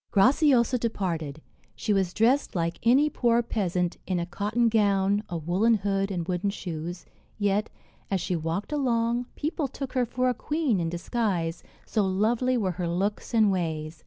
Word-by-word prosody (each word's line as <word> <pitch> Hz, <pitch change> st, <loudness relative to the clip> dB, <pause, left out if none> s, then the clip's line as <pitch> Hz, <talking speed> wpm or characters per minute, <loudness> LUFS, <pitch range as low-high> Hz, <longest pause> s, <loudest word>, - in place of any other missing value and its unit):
Graciosa 250 Hz, +3 st, +4 dB
departed. 165 Hz, -10 st, -3 dB, 0.3 s
She 210 Hz, -, 0 dB
was 190 Hz, -3 st, +1 dB
dressed 240 Hz, +7 st, +2 dB
like 170 Hz, 0 st, -1 dB
any 260 Hz, +6 st, +4 dB
poor 240 Hz, -4 st, +2 dB
peasant, 180 Hz, -6 st, -1 dB
in 185 Hz, -2 st, 0 dB
a 170 Hz, -, -1 dB
cotton 210 Hz, +6 st, 0 dB
gown, 200 Hz, -2 st, +2 dB
a 175 Hz, -, -3 dB
woollen 185 Hz, +8 st, +2 dB
hood 195 Hz, -1 st, 0 dB
and 175 Hz, -4 st, -3 dB
wooden 185 Hz, +2 st, 0 dB
shoes; 175 Hz, -3 st, -5 dB, 0.3 s
yet, 205 Hz, 0 st, +1 dB, 0.4 s
as 195 Hz, -, 0 dB
she 180 Hz, -, -2 dB
walked 165 Hz, -, -3 dB
along, 240 Hz, -4 st, 0 dB
people 305 Hz, -1 st, -2 dB
took 270 Hz, 0 st, -6 dB
her 250 Hz, -2 st, +1 dB
for 255 Hz, +2 st, 0 dB
a 250 Hz, -, +2 dB
queen 290 Hz, -, 0 dB
in 165 Hz, -1 st, -1 dB
disguise, 175 Hz, -2 st, -2 dB, 0.2 s
so 215 Hz, -, 0 dB
lovely 225 Hz, +7 st, +1 dB
were 195 Hz, -5 st, 0 dB
her 175 Hz, -, 0 dB
looks 195 Hz, +5 st, -2 dB
and 215 Hz, -3 st, +5 dB
ways. 160 Hz, -3 st, -3 dB
205 Hz, 165 wpm, -27 LUFS, 175-235 Hz, 0.4 s, and